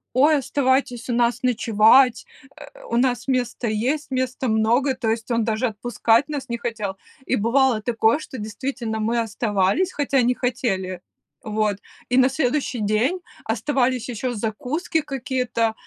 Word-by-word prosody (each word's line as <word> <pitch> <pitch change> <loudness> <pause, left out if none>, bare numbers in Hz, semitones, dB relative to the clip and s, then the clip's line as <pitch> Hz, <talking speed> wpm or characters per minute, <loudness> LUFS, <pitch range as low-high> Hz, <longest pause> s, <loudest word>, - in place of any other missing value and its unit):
"Ой, 295 +4 +5
оставайтесь 260 -3 0
у - - +1
нас 240 0 +1
ночевать, 235 +1 +4 0.3
э, 290 -2 -13
у 235 - -1
нас 245 -1 +1
место 250 -2 -1
есть, 255 +8 -1
места 260 0 -1
много!" 235 +5 +2
То 245 -3 -2
есть 225 +1 -2
он 230 -1 +2
даже 220 +2 0
отпускать 230 +3 +1
нас 280 -4 -5
не 235 - -2
хотел. 220 -5 -4 0.3
И - - +1
бывало 235 0 +2
такое, 230 +3 +2
что 265 -4 -9
действительно 220 +1 -4
мы 230 +2 0
оставались, 220 - 0
хотя 280 -2 +1
не 245 +1 +2
хотели. 195 -8 -2 0.4
Вот, 215 -2 0 0.3
и 250 - +1
на 260 0 +5
следующий 265 -2 -1
день 215 - +1 0.2
оставались 250 +2 0
еще 245 +1 -3
закуски 255 - -2
какие-то, 255 -5 -1
245 Hz, 150 wpm, -22 LUFS, 220-265 Hz, 0.4 s, Ой